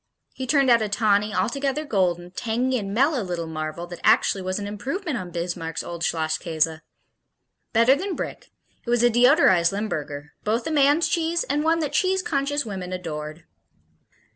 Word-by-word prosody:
He 260 - -6
turned 275 -2 +3
out 235 -1 +5
a 215 - -1
tawny, 210 0 +2
altogether 275 +7 -1
golden, 180 - 0
tangy 245 +5 -1
and 195 -2 -5
mellow 270 +5 +2
little 175 -3 -3
marvel 155 +1 -5
that 175 -1 -9
actually 195 - +3
was 185 0 -2
an 205 - -4
improvement 275 - -4
on 185 -6 -5
Bismarck's 170 -1 -4
old 170 -1 -7
Schlosskäse. 160 0 -1 0.9
Better 230 +4 +5
than 375 +5 -3
Brick, - - -6 0.3
it - - -8
was 240 0 +2
a 240 - +5
deodorized 240 - +5
Limburger, 150 -8 -4
both 225 +3 0
a 320 - -2
man's 295 +2 +4
cheese 335 +1 0
and 290 +2 -1
one 325 +1 +2
that 295 -2 -3
cheese 375 +2 +1
conscious 285 -1 -1
women 190 -4 -6
adored. 155 -3 -6
215 Hz, 165 wpm, -24 LUFS, 175-275 Hz, 0.9 s, out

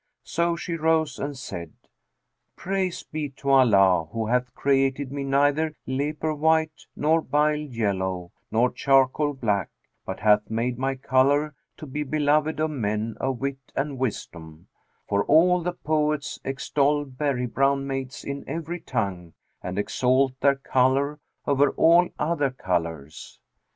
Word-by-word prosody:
So 170 0 0
she 170 0 -5
rose 160 -2 +1
and 140 -1 -4
said: 85 -10 -7 0.8
'Praise 185 -1 -2
be 150 -2 -4
to 140 0 -1
Allah 100 -10 +5
who 115 0 -2
hath 125 +2 -1
created 135 0 +1
me 140 0 -3
neither 145 +3 +1
leper 150 +4 -2
white 160 +1 +1
nor 160 +2 +2
bile 150 +1 +2
yellow 100 -10 -2 0.2
nor 120 +3 +2
charcoal 135 +2 +2
black, 105 -8 -1 0.3
but 95 - -6
hath 105 -1 +3
made 120 +2 -2
my 135 +1 0
colour 140 +3 +2 0.2
to - - -8
be 150 +2 -4
beloved 150 +2 +1
of 155 0 0
men 110 -4 -2
of 130 -1 -1
wit 135 +1 -3 0.2
and 135 -1 -2
wisdom, 85 -9 -5 0.4
for 100 0 +1
all 175 +4 +5
the 175 +1 -2
poets 150 -3 -1
extol 140 +2 0
berry 135 -1 -2
brown 135 +3 +1
maids 135 -1 -5
in 140 0 -5
every 165 +3 -4
tongue 95 - -3 0.3
and 90 +1 -5
exalt 130 +5 +2
their 140 -1 +4
colour 135 +2 +1 0.3
over 140 0 +3
all 170 +2 +5
other 150 -3 0
colours. 85 - -4
135 Hz, 140 wpm, -25 LUFS, 120-150 Hz, 0.8 s, Allah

